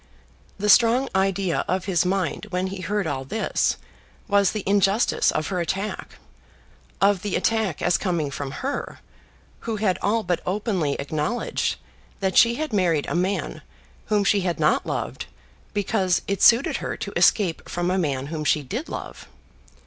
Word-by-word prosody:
The 205 +2 -2
strong 235 +5 +5
idea 190 -2 +1
of 185 0 -1
his 180 -3 +1
mind 190 +1 -1
when 180 -1 -1
he 190 0 -5
heard 200 +2 -1
all 140 -4 -2
this 215 +11 0 0.5
was 200 -1 +3
the 215 -3 -4
injustice 200 +3 +2
of 155 - -2
her 185 -2 -1
attack, 195 +5 -4 0.8
of 200 -1 +3
the 205 -1 -2
attack 220 -8 0
as 180 - +2
coming 170 -7 -1
from 140 -1 -4 0.2
her, 280 - -3 0.6
who 225 -1 -4
had 205 -4 0
all 220 +2 +1
but 175 -2 -1
openly 185 -6 -1
acknowledged 150 +11 -1 0.4
that 190 -1 -1
she 235 0 +6
had 310 -2 -4
married 170 -7 +2
a - - -2
man 185 +3 -1 0.5
whom 210 -1 +2
she 200 0 +3
had 180 -2 -2
not - - +2
loved - - -4 0.4
because 195 -3 0
it 200 -1 -2
suited 235 +4 +5
her - - -4
to - - -6
escape 185 -7 +2
from 175 +1 -1
a 190 - +1
man 140 -6 -1
whom 155 +1 -4
she 150 0 +2
did 235 - -5
love. - - -7
190 Hz, 165 wpm, -24 LUFS, 175-210 Hz, 0.8 s, she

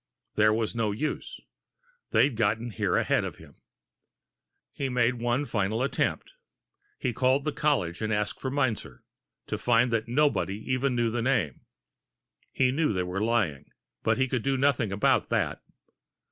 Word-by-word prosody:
There 110 0 +4
was 110 0 0
no 115 -3 0
use. 135 +9 -4 0.7
They'd 140 -4 +3
gotten 110 +1 0
there - - +1
ahead - - +2
of - - -5
him. - - -16 1.2
He 135 - -2
made 120 -1 +1
one 120 +4 +1
final 110 0 -1
attempt. 140 - -1 0.6
He 125 - -2
called 130 +3 +2
the 150 - -1
college, 115 - 0
asking 105 -1 -1
for 130 - -2
Meinzer, 120 - -2 0.4
to - - -4
find 120 0 +3
that 115 0 0
nobody 130 -6 +1 0.2
even 130 0 +1
knew 120 -1 +1
the 120 +1 -1
name! 115 - 0 0.9
He 130 -1 +2
knew 150 -3 +1
they 90 -1 0
were 90 +2 -3
lying 105 -11 0 0.3
but - - +1
he 130 0 +2
could 125 -2 -1
do 135 +3 0
nothing 130 -6 +2
about 100 +1 +2
that. - - 0
120 Hz, 155 wpm, -27 LUFS, 105-130 Hz, 1.2 s, There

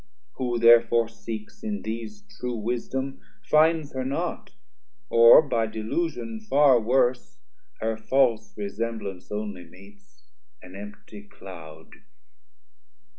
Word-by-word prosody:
Who 120 -2 -1
therefore 115 0 +5
seeks 110 -2 -8
in 210 -2 -4
these 115 - -6
True 200 - -6
wisdom, 125 +4 -4 0.2
finds 155 -1 +3
her 130 -1 -3
not, 160 +6 -3 0.6
or 115 +6 +8
by 115 -6 0
delusion 115 +1 -3
Far 135 +3 +4
worse, 120 - 0 0.4
her 110 0 -1
false 115 -1 +1
resemblance 105 -2 -5
only 105 -3 -5
meets, 100 +3 -19 0.4
320 - - -25
An 95 +3 -9
empty 105 0 -13
cloud. 85 -6 -12
115 Hz, 110 wpm, -25 LUFS, 105-130 Hz, 0.6 s, or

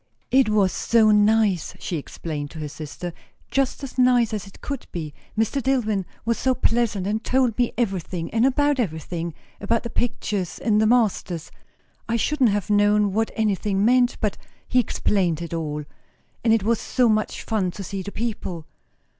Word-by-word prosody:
"It 260 -3 +5
was 205 -3 +3
so 225 -2 +3
nice!" 210 -4 +3
she 175 - -3
explained 145 0 -5
to 160 - -9
her 150 - -3
sister; 155 +4 -7 0.4
"just 275 +1 0
as 260 -1 -6
nice 245 -3 +4
as 205 -2 -3
it 195 - -15
could 280 -3 -5
be. 155 -4 -5 0.2
Mr. 225 +5 +1
Dillwyn 220 -7 +1 0.2
was 230 0 0
so 260 -1 +2
pleasant; 230 -6 +1
and 215 +2 -1
told 255 -3 +2
me 245 -1 +1
everything 185 -6 -2
and 225 +1 +2
about 285 +1 +3
everything; 165 - -3 0.2
about 225 +3 0
the 235 - -5
pictures, 205 -6 -2
and 215 -2 +2
the 220 - +4
masters; 205 -8 +1 0.6
I 230 - +1
shouldn't 260 +1 +2
have 205 -2 -1
known 205 -1 +3
what 225 +2 +1
anything 205 -2 +1
meant, 245 +1 +4
but 210 -2 0 0.3
he 250 - +3
explained 185 -8 +1
it 170 0 -6
all. 150 -2 -3 0.6
And 230 - +3
it 225 -3 +3
was 230 +1 +1
such 220 -4 +1
fun 210 -5 0
to 195 +3 -7
see 195 +1 -4
the 205 - -6
people." 200 -8 -4
215 Hz, 170 wpm, -23 LUFS, 185-235 Hz, 0.6 s, It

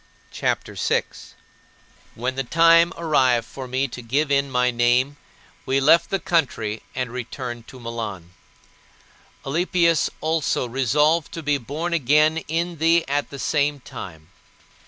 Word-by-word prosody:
CHAPTER - - -2
VI - - +1
14. - - -14 0.8
When 125 +3 -2
the 135 +1 -2
time 165 +4 +5
arrived 130 -8 +2
for 130 0 -8
me 130 +2 -1
to 125 - -8
give 140 +5 -1
in 140 0 +2
my 125 -1 +2
name, 125 +4 +2 0.5
we 135 +1 +1
left 165 +5 +4
the 195 - +1
country 130 - -1
and 130 -2 -3
returned 120 -1 -6
to 130 - -12
Milan. 110 -7 -6 1.1
Alypius 170 +1 +2
also 155 -5 0
resolved 150 +6 +1
to 165 - -6
be 145 -1 +1
born 155 +8 -4
again 155 +1 +3
in 170 +1 -2
thee 165 +1 +3
at 145 +1 -1
the 140 - -8
same 145 +1 0
time. 80 -10 -10
140 Hz, 140 wpm, -22 LUFS, 125-160 Hz, 1.1 s, time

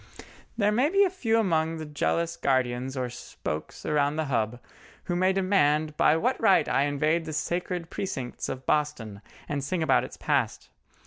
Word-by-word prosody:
There 210 -2 +3
may 250 +7 +2
be 395 +3 +4
a 380 - +2
few 230 -12 +1
among 165 -6 +1
the 160 - -6
jealous 165 +3 -1
guardians 130 0 0
or 125 -1 -1
spokes 80 -9 -6
around 145 -1 +1
the 160 0 -1
Hub 115 +1 0 0.4
who 175 - -2
may 185 +2 +3
demand 155 -6 +2
by 155 - +4
what 250 +10 0
right 200 -4 +4
I 140 - +2
invade 155 +3 +1
the 155 - -5
sacred 175 +2 -3
precincts 130 -10 -4
of 130 0 -6
Boston, 125 -9 -1 0.3
and 145 -1 -2
sing 165 +4 -1
about 155 - +3
its - - -8
past. - - -1
155 Hz, 175 wpm, -27 LUFS, 140-185 Hz, 0.4 s, be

